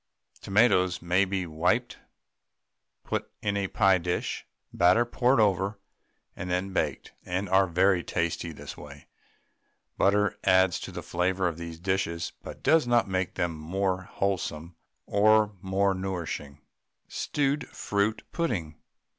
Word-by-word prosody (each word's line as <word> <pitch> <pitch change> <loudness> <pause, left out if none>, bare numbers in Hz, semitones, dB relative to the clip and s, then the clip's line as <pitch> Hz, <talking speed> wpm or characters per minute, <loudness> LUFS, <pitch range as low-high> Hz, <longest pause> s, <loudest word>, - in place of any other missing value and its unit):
Tomatoes 95 -4 +3
may 90 +3 +2
be 95 -1 -2
wiped, 90 +10 0 1.0
put - - -3
in 100 -1 0
a 100 -1 0
pie 95 -3 +3
dish, 90 +1 -3 0.3
batter 90 +7 +4
poured 125 +1 +2
over, 100 -1 +2 0.6
and 90 - -6
then 90 +2 -1
baked, - - -2
and 95 +3 -2
are 95 +1 +4
very 90 +1 +3
tasty 85 0 -2
this 75 - -9
way. - - -12 0.9
Butter 105 0 +2
adds 95 -1 +4
to - - -7
the - - -7
flavour 90 +1 0
of 85 -1 -4
these 85 -1 -7
dishes, 90 -2 -1
but - - -10
does 160 -5 +4
not 120 -2 +3
make 95 -1 -2
them 85 -2 -1
more 95 +4 -1
wholesome 90 -4 -3 0.3
or 105 +1 +4
more 95 +1 +1
nourishing. 85 -6 -5 0.5
STEWED 145 -1 -1
FRUIT 100 +2 -1
PUDDING. 90 - -2
95 Hz, 130 wpm, -27 LUFS, 90-100 Hz, 1.0 s, batter